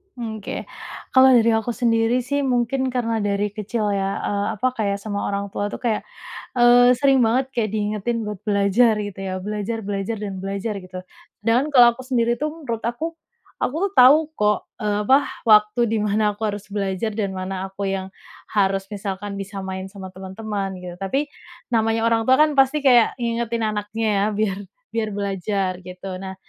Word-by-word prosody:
Mmm, 225 -3 -5
oke, 200 - -5 0.5
kalau 260 0 +7
dari 230 -1 +5
aku 225 +2 -2
sendiri 235 0 +2
sih 285 +3 -1
mungkin 260 +1 +1
karena 230 -3 0
dari 205 0 0
kecil 210 +1 -2
ya, 195 -1 0 0.2
eee, 200 0 -1
apa, 215 +5 0
kayak 200 -2 0
sama 205 -2 -3
orang 200 0 -2
tua 205 - -2
tuh - - -6
kayak, 225 -3 +1 0.6
eee, 245 +1 +7
sering 270 +1 +3
banget 250 +4 +2
kayak 230 -4 0
diingetin 215 +2 -1
buat 210 -2 -5
belajar 205 +3 +4
gitu 205 -2 -6
ya. 190 -1 -4
Belajar, 210 +2 -3
belajar, 200 +2 -3
dan 195 -2 -5
belajar 195 +3 -3
gitu 185 0 -9 0.5
dan 250 +6 +2
kalau 240 -3 +7
aku 260 - -9
sendiri 240 -2 +1
tuh 300 +5 -2
menurut 270 -8 -5
aku, 275 +9 -3 0.5
aku 285 - -1 0.2
tahu 290 +5 +7
kok, 210 0 +1
eee, 210 -1 0
apa, 265 +5 +6 0.3
waktu 210 +2 +5
di 225 - 0
mana 210 0 +1
aku 215 - -8
harus 205 0 -6
belajar 200 +1 -2
dan 210 -3 -1
mana 185 0 -4
aku 195 +1 -4
yang 195 -1 -2 0.4
harus 195 -2 +1
misalkan 200 0 -5
bisa 195 0 -6
main 190 0 -5
sama 190 -1 -9
teman-teman 195 +1 -5
gitu. 180 -1 -7
Tapi, 270 +10 -1 0.4
namanya 225 -1 +1
orang 225 -1 +1
tua 260 - +6
kan 305 0 +4
pasti 270 +3 +4
kayak 245 -3 +5
ngingetin 235 -1 -1
anaknya 215 +1 -2
ya 200 - +2
biar 205 -2 0 0.3
biar 225 -1 -2
belajar 195 -1 -1
gitu. 185 +1 -7
Nah, 190 0 -7
215 Hz, 175 wpm, -22 LUFS, 200-235 Hz, 0.6 s, kalau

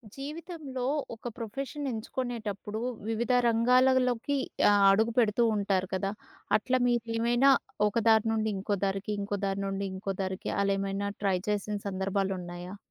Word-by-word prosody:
జీవితంలో 295 -2 -6 0.3
ఒక 225 - -8
ప్రొఫెషన్ 275 +5 -5
ఎంచుకునేటప్పుడు 220 -3 -4 0.3
వివిధ 235 +2 0 0.2
రంగాలలోకి 250 +2 +3 0.3
ఆహ్, 205 -1 +4
అడుగు 220 +4 +3
పెడుతూ 230 -1 +3
ఉంటారు 195 -2 0
కదా! 195 +1 -1 0.5
అట్లా 255 +4 0
మీరేమైనా 240 +2 +3 0.4
ఒక 205 - -4
దారి 220 0 +5
నుండి 220 0 0
ఇంకో 200 +2 -1
దారికి, 195 +1 -2
ఇంకో 200 0 -2
దారి 195 0 -1
నుండి 195 0 -2
ఇంకో 195 +1 -3
దారికి 190 -1 -3
అలా 200 0 +2
ఏమైనా 195 +1 -2
ట్రై 195 -2 +2
చేసిన 210 0 -1
సందర్భాలు 195 0 -1
ఉన్నాయా? 175 +2 -7
215 Hz, 135 wpm, -29 LUFS, 195-245 Hz, 0.5 s, దారి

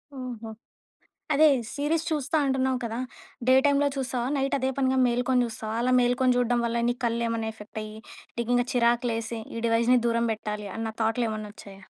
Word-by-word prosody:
ఓహో! 240 -4 -6 0.8
అదే 310 +2 +6 0.3
సీరీస్ 305 +3 0
చూస్తా 310 0 0
అంటున్నావు 265 -1 +1
కదా! 230 0 -3 0.5
డే 255 - +6
టైమ్‌లో 285 0 +3
చూస్తావా? 255 -2 -2
నైట్ 275 +1 0
అదే 260 +1 0
పనిగా 265 -1 +2
మేల్కొని 245 +1 +2
చూస్తావా? 220 -1 -5
అలా 255 +1 +1
మేల్కొని 250 +1 +2
చూడడం 245 0 +2
వల్ల 235 0 0
నీ 245 - 0
కళ్లేమన్నా 230 -1 -1 0.3
అయ్యి 215 0 -8 0.4
నీకింక 245 +1 +1
చిరాకులేసి 235 -1 +1 0.2
ఈ - - -3
డివైస్‌ని 235 +2 +4
దూరం 235 0 +1
పెట్టాలి 210 -1 -5
అన్న 225 0 -2
థాట్‌లేమన్నా 220 -2 -1
వచ్చాయా? 195 -2 -13
240 Hz, 150 wpm, -26 LUFS, 230-260 Hz, 0.8 s, అదే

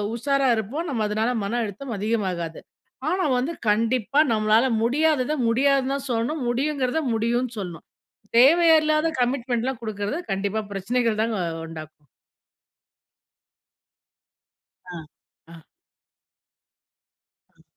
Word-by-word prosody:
உஷாரா 275 +2 +1
இருப்போம். 265 - -3
நம்ம 230 -5 -1
அதுனால 220 +3 0
மன 235 +4 -1
அழுத்தம் 220 +3 -6
அதிகமாகாது. 190 -6 -2 0.5
ஆனா, 370 0 0
வந்து 280 +7 -1 0.2
கண்டிப்பா 230 +5 +1
நம்மளால 215 +3 +3 0.2
முடியாதத, 295 +2 +1 0.2
முடியாதுன்னு 270 +2 +2
தான் 280 0 -5
சொல்லணும். 240 +6 -1
முடியுங்கிறத 270 +2 0
முடியுன்னு 235 +2 -1
சொல்லணும். 175 -4 -7 0.5
தேவையே 325 +5 +6
இல்லாத 310 +1 +2
கமிட்மென்ட்லாம் 245 0 -1
குடுக்குறது 210 +5 -3
கண்டிப்பா 200 +3 -1
பிரச்சனைகள் 220 +3 -1
தாங்க 225 -2 -1 0.3
உண்டாக்கும். 155 -2 -11 2.9
ஆ. 170 - -6 0.5
ஆ 165 -2 -13 1.9
அ. - - -28
235 Hz, 100 wpm, -24 LUFS, 215-275 Hz, 2.9 s, தேவையே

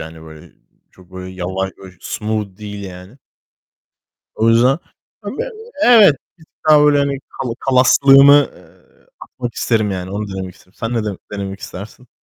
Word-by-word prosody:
yani, 80 0 -9
böyle, 80 -1 -14 0.4
çok 95 0 -21
böyle 95 0 -8
yavaş 95 +1 -3
böyle 95 -1 -13
smooth 105 -3 -4
değil 105 -1 -8
yani. 95 +6 -11 1.2
O 110 - +1
yüzden, 125 +5 +3 0.4
hani, - - -7
böyle - - -3 0.3
Evet, 220 - +7 0.2
bir 160 - -18
tık - - -44
daha 150 -1 +7
böyle, 145 -1 +4
hani, 140 -1 0
kala 125 -3 -5
kalaslığımı, 135 +2 +6
eee, - - -23
atmak 120 -1 -7
isterim, 110 -3 0
yani 95 -1 -5
onu 105 +1 -4
denemek 95 -1 -6
isterim. 90 - -24
Sen 115 +1 -3
ne 115 - -1
dene 105 -3 -4 0.2
denemek 100 -1 -5
istersin? 110 +6 -10
105 Hz, 160 wpm, -17 LUFS, 95-135 Hz, 1.2 s, Evet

